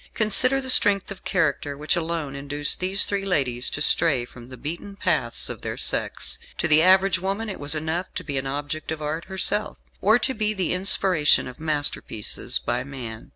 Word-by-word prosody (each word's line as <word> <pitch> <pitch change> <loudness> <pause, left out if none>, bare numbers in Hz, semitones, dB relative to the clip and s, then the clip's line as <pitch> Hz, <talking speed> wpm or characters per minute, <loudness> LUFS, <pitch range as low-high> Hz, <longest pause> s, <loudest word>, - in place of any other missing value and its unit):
Consider 245 +5 +5
the 260 -1 -1
strength 200 -5 +2
of 195 - -9
character 145 -5 -1
which 150 +3 -1
alone 165 -4 -3
induced 145 +1 -3
these 190 +2 +4
three 200 -1 -2
ladies 135 -10 0
to 145 - -2
stray 145 -9 +2
from 120 0 -14
the 130 - -10
beaten 170 - -6
paths 155 - 0
of - - -6
their - - -5
sex. - - 0 0.2
To - - +1
the 155 0 +5
average 185 0 +4
woman 195 +4 -3
it 195 - -7
was 145 +2 +1
enough 160 +4 -3
to 180 - -4
be 140 -5 -2
an 135 - -5
object 145 +3 -5
of 160 - -4
art 155 +3 -4
herself, 190 +2 -1 0.2
or 215 +4 +4
to 265 +2 -1
be 215 -2 -2
the 185 -3 -1
inspiration 185 -6 +3
of 125 - -11
masterpieces 145 -8 0
by 125 +1 -3
man. 125 -5 -9
160 Hz, 195 wpm, -23 LUFS, 145-195 Hz, 0.2 s, Consider